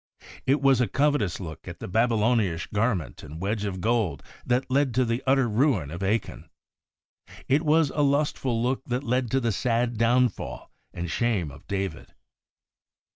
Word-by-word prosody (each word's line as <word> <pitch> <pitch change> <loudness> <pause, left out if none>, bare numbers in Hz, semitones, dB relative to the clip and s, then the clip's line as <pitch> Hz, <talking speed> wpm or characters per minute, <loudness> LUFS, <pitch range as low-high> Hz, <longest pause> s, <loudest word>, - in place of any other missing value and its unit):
It 140 +2 +2
was 135 -2 +5
a 120 - +2
covetous 140 - +1
look 80 -5 -8
at - - -7
the - - -6
Babylonish 110 -4 +1
garment 100 - -1
and 75 +1 -9
wedge 105 +3 -2
of 95 -2 -3
gold 110 -4 0 0.2
that 125 +1 0
led 135 -2 +2
to 130 0 +3
the 115 +2 -1
utter 135 -1 +4
ruin 110 - +1
of 85 +3 -6
Achan. 100 +3 -2 1.0
It 140 +3 +3
was 155 -2 +3
a 150 - 0
lustful 140 -4 +1
look 130 +1 0
that 125 +2 -2
led 125 -1 0
to 135 - +2
the 115 -3 0
sad 120 +1 0
downfall 120 -1 +1 0.2
and 85 0 -5
shame 100 -8 0
of 70 - -15
David. 95 -4 -4
115 Hz, 165 wpm, -26 LUFS, 100-130 Hz, 1.0 s, was